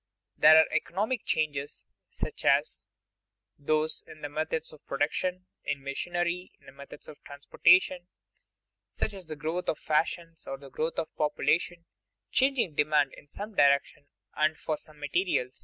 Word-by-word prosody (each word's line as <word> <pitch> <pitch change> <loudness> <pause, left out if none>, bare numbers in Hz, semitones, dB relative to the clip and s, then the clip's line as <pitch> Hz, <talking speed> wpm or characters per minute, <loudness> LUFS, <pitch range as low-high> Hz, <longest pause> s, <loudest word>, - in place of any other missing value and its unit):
There 155 +1 +8
are 160 - +7
economic 215 +6 -1
changes, 145 -7 -2 0.2
such - - -6
as - - +2 0.7
those 155 +2 0
in 155 - -13
methods 160 +1 -2
of 150 - -16
production, 180 +6 -1 0.2
in 140 -1 -3
machinery, 175 +5 -2
in 135 - -16
methods 140 +1 -12
of 150 - -13
transportation; 175 +5 +3 0.8
such - - -2
as 190 -4 -11
the 155 - -5
growth 160 +4 -3
of - - 0
fashions 165 +1 -1
or 135 - -4
the 135 -1 -13
growth 160 +2 -2
of 160 - -3
population 165 +3 0 0.5
changing 265 - +2
demand 150 -1 +2
in - - -14
some 205 +9 -7
directions 140 -2 +2 0.3
and 155 +1 +1
for 155 - -2
some 150 0 -14
materials. 145 -4 -1
155 Hz, 140 wpm, -29 LUFS, 145-175 Hz, 0.8 s, There